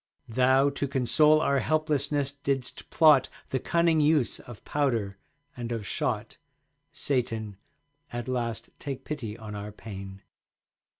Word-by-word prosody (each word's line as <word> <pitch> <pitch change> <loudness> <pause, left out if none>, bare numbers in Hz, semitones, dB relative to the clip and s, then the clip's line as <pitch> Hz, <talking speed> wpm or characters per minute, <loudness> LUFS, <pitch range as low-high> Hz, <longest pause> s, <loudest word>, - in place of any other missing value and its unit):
Thou, 130 +4 +4
to 140 0 -2
console 150 +4 +4
our 140 -2 +2
helplessness, 145 -2 +1
didst 140 -3 -3
plot 150 -5 +5 0.2
The 130 - 0
cunning 170 +2 +2
use 150 -4 +2
of 120 -3 -12
powder 115 -9 0 0.4
and 120 -1 -5
of 115 -3 -3
shot. 105 +1 -2 0.5
Satan, 115 -6 -2 0.5
at 120 +1 -4
last 120 -3 -3
take 135 -2 -5
pity 120 -8 -5
on 110 -2 -8
our 105 0 -6
pain. 100 -2 -9
130 Hz, 125 wpm, -28 LUFS, 110-145 Hz, 0.5 s, plot